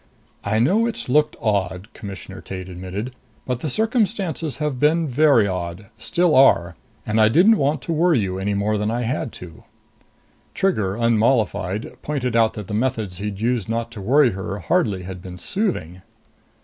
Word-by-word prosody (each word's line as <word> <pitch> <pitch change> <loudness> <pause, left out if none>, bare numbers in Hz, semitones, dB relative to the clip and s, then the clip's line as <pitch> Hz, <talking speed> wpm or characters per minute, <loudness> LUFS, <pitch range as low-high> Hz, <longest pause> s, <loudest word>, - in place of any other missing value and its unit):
"I 110 - 0
know 195 - +3
it's 230 - -5
looked 150 +3 +3
odd," 100 -3 -1
Commissioner 95 -5 -9
Tate 95 -1 -7
admitted, 95 +7 -6 0.3
"but 125 -2 -2
the 155 - -3
circumstances 200 - 0
have 150 -4 -2
been 155 +3 +3
very 140 -4 +4
odd. 90 +2 -5
Still 170 +9 +1
are. 90 -10 +5 0.3
And 110 +1 +1
I 110 - +6
didn't 195 - +5
want 145 0 0
to 165 - -2
worry 165 -1 +3
you 95 -2 -2
any 100 +1 -1
more 105 +1 0
than 105 +1 0
I 120 +2 -1
had 120 0 -2
to." 85 -3 -11 0.9
Trigger, 105 - 0
unmollified, 110 -3 0
pointed 130 -5 -2
out 115 -1 +3
that 105 - -7
the 105 - -7
methods 110 -5 -1
he'd 105 0 -5
used 115 -3 0
not 115 0 -2
to 110 - -8
worry 130 +5 +4
her 95 +1 -5
hardly 105 - 0
had 90 0 -7
been 90 -1 -9
soothing. 90 - -2
115 Hz, 170 wpm, -22 LUFS, 95-150 Hz, 0.9 s, I